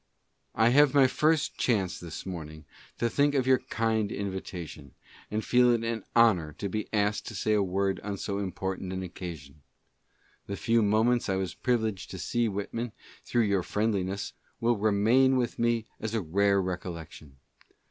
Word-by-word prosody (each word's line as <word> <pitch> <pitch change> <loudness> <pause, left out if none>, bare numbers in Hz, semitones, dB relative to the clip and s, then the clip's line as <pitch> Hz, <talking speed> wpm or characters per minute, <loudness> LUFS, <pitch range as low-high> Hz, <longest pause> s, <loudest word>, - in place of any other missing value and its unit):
I 110 +2 +4
have 145 +2 +5
my 140 -2 +7
first 150 +3 +1
chance 95 -8 +1
this 85 -3 -8
morning 80 -4 -7 0.3
to 120 - +1
think 145 +4 +2
of 130 -2 +2
your 130 -1 +4
kind 110 -2 -1
in 100 -1 -3
vitation, 85 -6 -8 0.3
and 110 +1 -2
feel 125 0 +5
it 120 -1 +2
an 115 -2 -2
honor 95 -10 +4
to 100 - -4
be 105 +2 -3
asked 105 -1 0
to - - -6
say 110 - 0
a 105 - +3
word 95 +1 0
on 100 -1 -5
so 100 +1 -3
important 95 -1 -4
an 95 0 -3
occasion. 80 -5 -8 0.9
The 100 - -4
few 115 0 +2
mome::; 110 +4 +3
Z 95 -4 -2
was 95 -2 -2
privileged 110 -6 -1
to 95 - -7
see 120 +4 0
Whitman, 105 +3 -4 0.3
through 120 - +1
your 100 -3 +1
friendliness, 100 -1 -1 0.3
will 120 +1 +2
remain 110 +6 +3
with 120 -2 -1
me 115 -1 +1
as 110 +1 -3
a 110 - +1
rare 100 +4 +2
recollection. 85 -6 -6
105 Hz, 170 wpm, -28 LUFS, 95-115 Hz, 0.9 s, my